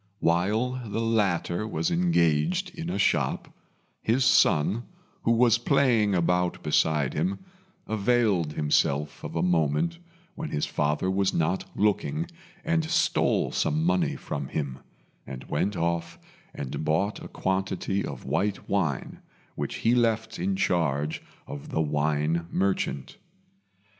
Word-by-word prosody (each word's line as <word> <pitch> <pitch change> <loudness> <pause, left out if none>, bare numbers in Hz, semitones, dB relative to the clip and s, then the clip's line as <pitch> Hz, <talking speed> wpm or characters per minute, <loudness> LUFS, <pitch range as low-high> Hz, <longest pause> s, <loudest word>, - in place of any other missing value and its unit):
While 110 +10 +1
the 110 - -2
latter 105 -4 0
was 165 +10 -1
engaged 170 - +2
in 165 0 -5
a - - -2
shop, 100 - +1 0.5
his 125 +3 +2
son, 100 +2 +4 0.4
who 115 - +1
was 115 0 +4
playing 120 -6 +3
about 90 +1 +1
beside 75 -2 +2
him, 90 +6 -1 0.5
availed 105 -7 +1
himself 75 -1 0
of - - -6
a 80 - +1
moment 90 - +1 0.3
when 160 -1 -5
his 75 - -1
father 75 +5 0
was 95 0 +1
not 85 +3 0
looking 105 +10 +1 0.4
and 165 0 +2
stole 160 - +1
some 75 +1 0
money 90 +2 +1
from 70 -1 -5
him, 70 -3 -4 0.5
and 65 0 -7
went 100 -1 -1
off 85 0 -1 0.3
and 70 +2 -5
bought 95 +7 0
a - - -7
quantity 95 +1 -1
of - - -7
white 100 +5 -1
wine, 85 -9 -1 0.3
which - - -4
he 115 - +5
left 115 -2 +1
in 195 +1 0
charge 80 - 0 0.2
of 70 - -8
the - - -1
wine 75 +2 0
merchant. 95 -7 -1
95 Hz, 130 wpm, -27 LUFS, 80-115 Hz, 0.5 s, he